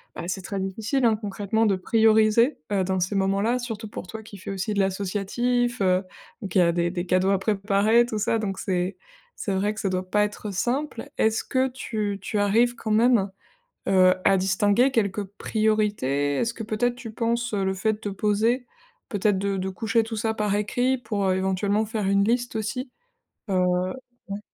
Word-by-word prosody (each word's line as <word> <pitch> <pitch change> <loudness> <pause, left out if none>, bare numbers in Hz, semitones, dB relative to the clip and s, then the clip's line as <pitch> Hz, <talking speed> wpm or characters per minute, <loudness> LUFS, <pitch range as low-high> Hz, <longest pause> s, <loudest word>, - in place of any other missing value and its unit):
bah, - - -5
c'est 185 +1 -3
très 200 0 -4
difficile, 220 +7 -1
hein, 225 - +4
concrètement, 210 +1 -1
de 200 -3 +3
prioriser, 220 +5 +3
heu, 195 -2 +2
dans 190 0 -1
ces 180 +3 -1
moments-là. 195 +5 +1
Surtout 225 -3 -5
pour 205 - -7
toi 220 +3 -7
qui 210 -2 -12
fais 185 - -9
aussi 195 +2 -2
de - - 0
l'associatif, 205 +5 0
heu, 185 0 +3 0.5
qui 185 - +3
a 170 -1 +4
des 170 0 0
des 180 0 -3
cadeaux 185 +2 +2
à 195 - +2
préparer 205 +3 +3
tout 220 -3 -3
ça 210 +2 +1
donc 200 -3 -3
c'est 180 0 -1 0.5
c'est 200 - -1
vrai 205 +2 0
que 215 - -8
ça 200 - -1
doit 185 0 -2
pas 210 +2 +3
être, 210 +1 -6
heu, - - -4
simple. 250 +6 -2
Est-ce 220 0 +2
que 260 0 +1
tu 215 -5 -3
tu 205 +2 -2
arrives 230 +4 +3
quand 220 - -6
même, 220 -2 +4 0.6
heu, 185 -1 +5
à 195 - +5
distinguer 205 +6 +3
quelques 210 -5 0
priorités? 205 - 0
Est-ce 230 0 0
que 225 - -5
peut-être 230 +3 0
tu 240 -2 -8
penses 235 +1 -1
heu, 200 -2 0
le 190 - 0
fait 210 +3 0
te 220 - -6
poser, 215 +5 +1 0.4
peut-être 205 -1 +1
de 195 0 -1
de 190 0 -2
coucher 225 +5 0
tout 225 0 -5
ça 220 +1 -1
par 210 -2 0
écrit 245 +5 +1
pour, 215 -4 -2
heu, 185 -1 +2
éventuellement 190 +3 0
faire 215 -2 -2
une 200 0 +3
liste 240 +2 0
aussi, 225 +5 -3 0.6
heu, 185 -1 +2 0.7
ouais. 200 +1 -4
210 Hz, 195 wpm, -25 LUFS, 195-225 Hz, 0.7 s, heu